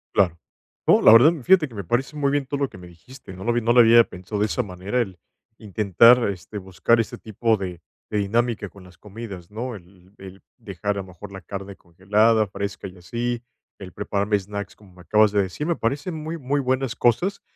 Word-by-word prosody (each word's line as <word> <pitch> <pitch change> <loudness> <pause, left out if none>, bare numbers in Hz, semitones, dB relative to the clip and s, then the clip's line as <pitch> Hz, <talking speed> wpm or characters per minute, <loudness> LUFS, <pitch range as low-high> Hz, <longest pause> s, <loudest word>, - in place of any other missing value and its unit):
Claro. 85 -4 +2 0.5
No, - - +5
la - - +8
verdad, 125 +9 +7
fíjate 180 +1 +4
que 125 - -16
me 100 - -5
parece 125 - -2
muy 140 -2 0
bien 145 -1 0
todo 140 +2 -4
lo 140 - 0
que - - -13
me 90 -1 -12
dijiste, 95 - -14
no 95 +1 -9
lo 120 - +1
vi, 120 - +1
no 115 +1 +2
lo 125 - +7
había 115 0 +7
pensado 95 +3 -7
de 105 - +2
esa 90 - -1
manera, 100 +5 -3
el 95 -6 -5 0.4
intentar, 110 +3 +4
este, 95 +2 -7
buscar 95 +4 +1
ese 115 - -6
tipo 110 +1 -1
de 90 -3 -6 0.3
de 105 - 0
dinámica 110 +1 -1
con 95 +1 -16
las 90 0 -17
comidas, 100 -4 -9
¿no?, 120 +3 -5
el 95 0 -17
el 95 0 -12 0.2
dejar, 100 -4 -4
a - - -2
lo - - -10
mejor, 95 +2 -12
la 95 - -8
carne 100 0 -8
congelada, 105 +6 +1
fresca 100 +1 -5
y 90 - -13
así, 120 +6 -3 0.4
el 95 -3 -10
prepararme 100 +1 -1
snacks, 100 +1 -7
como 100 -3 -20
me 90 - -16
acabas 105 +3 +3
de 100 -1 +2
decir, 95 +10 -4
me 170 +1 0
parecen 145 +9 -2
muy, 160 +1 -5
muy 140 0 -1
buenas 130 -1 -1
cosas. 180 - +1
105 Hz, 220 wpm, -23 LUFS, 95-120 Hz, 0.5 s, la